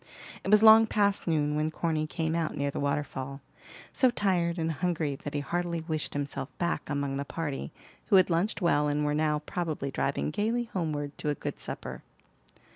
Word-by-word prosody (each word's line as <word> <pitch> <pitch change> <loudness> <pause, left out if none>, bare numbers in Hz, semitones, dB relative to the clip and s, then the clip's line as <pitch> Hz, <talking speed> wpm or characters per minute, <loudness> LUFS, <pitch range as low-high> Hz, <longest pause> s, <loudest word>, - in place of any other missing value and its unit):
It - - -3
was 210 +1 +6
long 220 0 +9
past 200 -3 +1
noon 150 -2 +1
when 155 +1 +1
Corny 155 -1 -1
came 160 0 -2
out 165 -2 -1
near 140 0 0
the - - -4
waterfall, 140 -1 -2 0.5
so 260 - +4
tired 185 -7 +1
and 165 -1 0
hungry 155 -2 -1
that 145 +2 -7
he 145 - 0
heartily 170 +2 -2
wished 155 -3 -2
himself 140 -1 -3
back 170 0 -2
among 140 -1 -1
the 140 - -2
party, 145 -2 -4 0.4
who - - +4
had 185 -1 +5
lunched 180 +4 0
well 150 -3 +3
and 150 0 0
were 150 - +1
now 150 0 +1
probably 155 -6 -3
driving 140 +2 -1
gayly 225 +7 0
homeward 150 -5 -2
to 150 - -1
a 145 - 0
good - - -5
supper. - - -5
155 Hz, 190 wpm, -29 LUFS, 145-175 Hz, 0.5 s, long